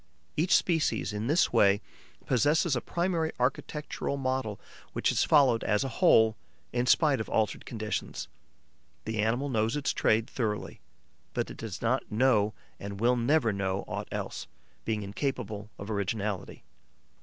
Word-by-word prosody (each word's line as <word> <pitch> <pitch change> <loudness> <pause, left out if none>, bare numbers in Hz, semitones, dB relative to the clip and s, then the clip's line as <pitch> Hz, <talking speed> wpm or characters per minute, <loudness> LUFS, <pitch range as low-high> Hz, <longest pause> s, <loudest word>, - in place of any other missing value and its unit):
Each 170 +5 +3
species, 155 - +1
in 105 +2 -3
this 155 +6 +3
way, 100 0 +5 0.5
possesses 145 +4 +2
a 120 - -1
primary 170 -2 -1
architectural 150 -2 -2
model 130 -6 -2 0.3
which - - +1
is - - +2
followed 135 -6 +4
as 105 +4 +1
a 135 - -2
whole, 110 -1 +6 0.4
in 120 +1 0
spite 145 -4 +4
of - - -6
altered 110 -1 0
conditions. 110 -2 -4 0.8
The 110 0 -3
animal 120 +6 +1
knows 115 -2 0
its 145 -1 0
trade 110 +1 +2
thoroughly, 110 -5 -3 0.5
but - - -1
it - - -10
does 110 -3 -6
not 125 +2 0
know 110 -2 +3 0.2
and 100 0 -6
will 120 +3 +3
never 120 -1 +2
know 100 0 -2
aught - - -4
else, - - -4 0.4
being 110 -2 -1
incapable 105 -1 -3
of 100 +2 -6
originality. 100 -1 -3
115 Hz, 145 wpm, -29 LUFS, 105-135 Hz, 0.8 s, whole